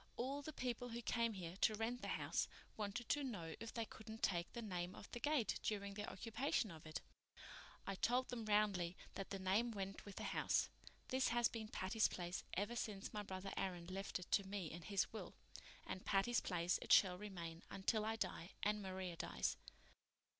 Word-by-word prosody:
All 270 +4 0
the 310 - -5
people 245 -3 -2
who 235 +1 -3
came 230 -1 +2
here 175 -3 -5
to 215 - +4
rent 230 +3 -1
the - - -3
house - - +1 0.3
wanted 215 +3 -2
to 290 - +3
know 185 -11 -3
if 230 - -4
they 230 -1 -1
couldn't 220 +1 -9
take 175 -2 +2
the 235 - -4
name 180 -3 -2
off - - -10
the 240 - -3
gate 290 -4 +2
during 200 -2 -1
their 205 +1 -3
occupation 230 - 0
of 160 -1 -9
it. 155 - -3 0.8
I 195 - -1
told 245 +6 +2
them 235 -3 -3
roundly 200 -4 +3 0.2
that 195 - -4
the 195 - -2
name 195 +5 +3
went 195 -3 -3
with 200 - -8
the - - -4
house. - - +2 0.4
This 260 +1 +3
has 240 0 +4
been 220 -2 -4
Patty's 215 +2 +3
Place 175 0 -3
ever 205 +6 0
since 205 -4 -2
my 210 - -1
brother 195 -1 -4
Aaron 180 -3 -1
left 195 +1 -1
it 180 - -9
to 200 - +5
me 190 -4 -3
in 170 - -6
his 195 +5 +1
will, 220 - -5 0.5
and 185 - -4
Patty's 205 +4 +3
Place 175 -1 +2
it - - -3
shall 180 -2 +8
remain 170 -5 -5
until 210 +3 +1
I 220 +1 +1
die 185 -5 -2
and 210 0 +3
Maria 185 -2 -3
dies. 65 - 0
205 Hz, 195 wpm, -42 LUFS, 185-230 Hz, 0.8 s, shall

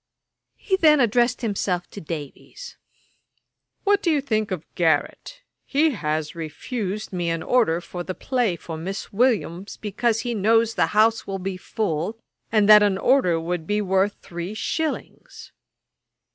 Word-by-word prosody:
He 380 -3 -1
then 305 -5 +5
addressed 240 +1 +2
himself 195 -5 -1
to 200 - -8
Davies: 160 - -8 1.1
'What 405 0 +3
do 350 - +1
you 305 -3 +3
think 215 -6 -1
of 180 -4 -4
Garrick? 170 - -1 0.2
He 300 +3 +2
has 155 - -2
refused 195 - -5
me 175 -2 -1
an 165 -1 -2
order 225 -10 +2
for 175 0 -7
the 185 +1 -5
play 245 -8 0
for 165 -1 -7
Miss 190 +6 -6
Williams, 200 -5 0
because 225 +2 -1
he 240 -1 -3
knows 225 +2 +3
the - - +2
house 225 +1 +3
will 195 -1 -3
be 190 0 -4
full, 185 +1 -3 0.3
and 215 -2 +3
that 210 0 +9
an 200 -2 +2
order 195 -8 +3
would 165 0 -3
be 210 0 +1
worth 195 0 +1
three 175 +3 -6
shillings.' 315 +7 -4
205 Hz, 150 wpm, -23 LUFS, 175-240 Hz, 1.1 s, that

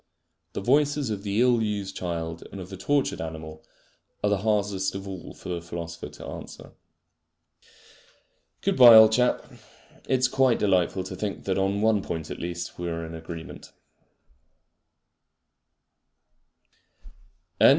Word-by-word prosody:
The - - -4
voices 145 +2 +2
of 100 -2 -3
the 100 +1 -1
ill 125 -2 +4
used 100 -3 -3
child 85 -2 -4
and 100 - -8
of 90 -1 -8
the 95 - -7
tortured 140 +9 0
animal 80 -1 -7 0.6
are 105 - +2
the 100 - +3
hardest 100 -2 0
of 95 0 -6
all 95 -3 -8
for - - -10
the 85 -1 -3
philosopher 85 0 -7
to - - -11
answer. - - -9 1.9
Good - - 0
bye, 120 -3 +10
old 110 0 +9
chap! 125 +2 +2 0.6
It 130 - +4
is 130 0 +3
quite 130 -1 +3
delightful 95 -2 +1
to 95 0 -7
think 100 +1 -4
that 95 0 -1
on 100 +2 0
one 110 -2 +3
point 80 -4 -5
at - - -6
least 85 0 -5
we 85 0 -3
are 85 0 -4
in 80 - -8
agreement. 80 0 -9
95 Hz, 140 wpm, -26 LUFS, 85-110 Hz, 1.9 s, bye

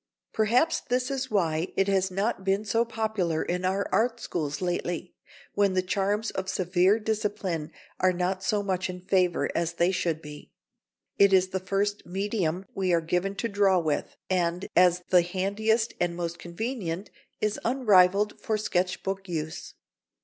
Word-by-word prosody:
Perhaps 240 +9 +2
this 250 +1 0
is 265 -1 -2
why 170 -5 +1
it 195 - +3
has 190 -1 +2
not 195 +2 -1
been 195 +2 0
so 225 +3 +2
popular 220 -8 -1
in 180 +1 -2
our 190 +2 0
art 235 +1 +1
schools 150 -8 -3
lately, 175 -1 -3 0.4
when 200 -2 +2
the 185 - +2
charms 200 +4 0
of 190 0 -4
severe 185 +2 +3
discipline 205 -7 -2 0.3
are 185 - +4
not 185 +1 -1
so 205 +1 +1
much 190 -1 -1
in 180 0 -6
favour 185 -2 +2
as 170 0 -1
they 170 +2 +2
should 170 -4 -1
be. 150 -1 -11 0.7
It 200 -1 +6
is 185 0 +4
the 190 - -2
first 200 +2 -1
medium 190 -2 -1
we 190 -2 0
are 170 - +4
given 180 +4 -1
to 230 - -2
draw 200 -3 +3
with, 155 -4 -1
and 180 -1 0
as 180 0 +4
the 180 -1 +6
handiest 205 +6 0
and 175 -1 0
most 170 -1 -4
convenient 185 -1 -4 0.3
is 210 -1 -1
unrivalled 210 -5 +3
for 220 - 0
sketch 180 -3 -1
book 195 0 -4
use. 160 -2 -5
190 Hz, 165 wpm, -27 LUFS, 175-210 Hz, 0.7 s, It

